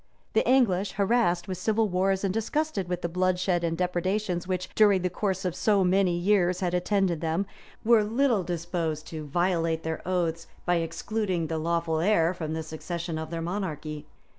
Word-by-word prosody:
The -, -, +3 dB
English, 205 Hz, -7 st, +3 dB
harassed 200 Hz, -4 st, +1 dB
with 185 Hz, -2 st, -4 dB
civil 220 Hz, +3 st, +2 dB
wars, 190 Hz, +1 st, +1 dB
and 195 Hz, -2 st, 0 dB
disgusted 225 Hz, -, -1 dB
with 180 Hz, -1 st, -3 dB
the -, -, +1 dB
bloodshed 180 Hz, 0 st, +1 dB
and 165 Hz, -1 st, -1 dB
depredations 180 Hz, +1 st, -1 dB
which, 185 Hz, -1 st, -2 dB
during 205 Hz, -4 st, +4 dB
the 180 Hz, -, 0 dB
course 190 Hz, -1 st, -2 dB
of 180 Hz, -, 0 dB
so 205 Hz, -3 st, +3 dB
many 185 Hz, -1 st, +2 dB
years, 180 Hz, -1 st, +2 dB
had 180 Hz, -2 st, -1 dB
attended 180 Hz, -2 st, +1 dB
them 165 Hz, +4 st, 0 dB, 0.4 s
were 230 Hz, -1 st, +6 dB
little 230 Hz, 0 st, +2 dB
disposed 170 Hz, -3 st, -3 dB
to 155 Hz, -2 st, -6 dB
violate 165 Hz, 0 st, 0 dB
their 160 Hz, 0 st, -3 dB
oaths, 170 Hz, -2 st, -1 dB, 0.2 s
by 175 Hz, 0 st, +2 dB
excluding 175 Hz, +2 st, -2 dB
the 160 Hz, 0 st, -2 dB
lawful 165 Hz, 0 st, 0 dB
heir 170 Hz, -2 st, +3 dB
from 160 Hz, -3 st, -4 dB
the 160 Hz, 0 st, -3 dB
succession 165 Hz, +1 st, -5 dB
of 160 Hz, 0 st, -5 dB
their 165 Hz, 0 st, -4 dB
monarchy. 155 Hz, -5 st, -4 dB
180 Hz, 175 wpm, -27 LUFS, 165-195 Hz, 0.4 s, were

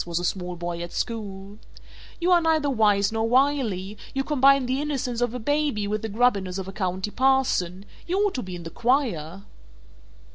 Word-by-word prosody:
was 170 Hz, -1 st, -3 dB
a 175 Hz, -, -1 dB
small 180 Hz, -1 st, -2 dB
boy 170 Hz, 0 st, -4 dB
at 175 Hz, 0 st, -6 dB
school, 205 Hz, -3 st, -5 dB, 0.6 s
"you 350 Hz, +1 st, +1 dB
are 350 Hz, -1 st, +6 dB
neither 315 Hz, -3 st, +2 dB
Wise 205 Hz, -4 st, +3 dB
nor 225 Hz, 0 st, 0 dB
Wily; 235 Hz, -7 st, +1 dB, 0.2 s
you 270 Hz, -, +1 dB
combine 275 Hz, -2 st, +4 dB
the 260 Hz, +3 st, -1 dB
innocence 260 Hz, -5 st, -2 dB
of 245 Hz, 0 st, 0 dB
a -, -, -1 dB
Baby 285 Hz, -3 st, 0 dB
with 210 Hz, +1 st, -2 dB
the 225 Hz, -, -4 dB
grubbiness 200 Hz, -5 st, +1 dB
of 190 Hz, -1 st, -5 dB
a -, -, -5 dB
County 190 Hz, +1 st, -2 dB
Parson 250 Hz, -9 st, +1 dB, 0.2 s
you 360 Hz, +2 st, 0 dB
ought 410 Hz, -1 st, +2 dB
to 255 Hz, -, -3 dB
be 185 Hz, -4 st, -7 dB
in 175 Hz, -, -8 dB
the 165 Hz, -, -7 dB
choir." 200 Hz, -, 0 dB
220 Hz, 190 wpm, -25 LUFS, 190-270 Hz, 0.6 s, are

